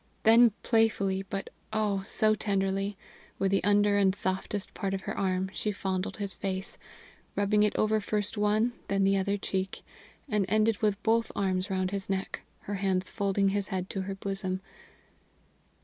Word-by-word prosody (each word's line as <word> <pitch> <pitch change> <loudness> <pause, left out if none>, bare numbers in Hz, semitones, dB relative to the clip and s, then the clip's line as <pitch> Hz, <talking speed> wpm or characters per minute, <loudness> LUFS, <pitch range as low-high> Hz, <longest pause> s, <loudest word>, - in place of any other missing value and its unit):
Then 230 +2 +7
playfully, 205 -4 +2
but 195 -1 -4 0.2
oh! 210 -2 0
so 215 -2 +2
tenderly, 195 -1 -1 0.4
with 195 0 +1
the 195 - +2
under 205 +1 +4
and 190 -1 +3
softest 190 +1 -2
part 195 -1 -2
of 190 - -4
her - - -4
arm 190 0 0
she 210 - -1
fondled 190 -2 -3
his 200 -2 +2
face, 190 -1 -4 0.6
rubbing 205 +1 +2
it 210 -1 +2
over 215 0 +2
first 205 0 -2
one, 215 +3 +2
then 195 0 +1
the 195 0 +4
other 200 +1 0
cheek, 190 -1 -3 0.4
and 210 -6 +1
ended 215 +1 +2
with 210 -1 +1
both 230 +1 +2
arms 190 0 0
round 185 -1 0
his 195 -1 -4
neck, 195 0 -2 0.2
her 205 - -5
hands 190 -1 0
folding 195 -1 +1
his 200 0 -1
head 185 -2 -3
to 195 - -2
her 195 +1 -4
bosom. 195 -1 -3
200 Hz, 165 wpm, -29 LUFS, 190-210 Hz, 0.6 s, Then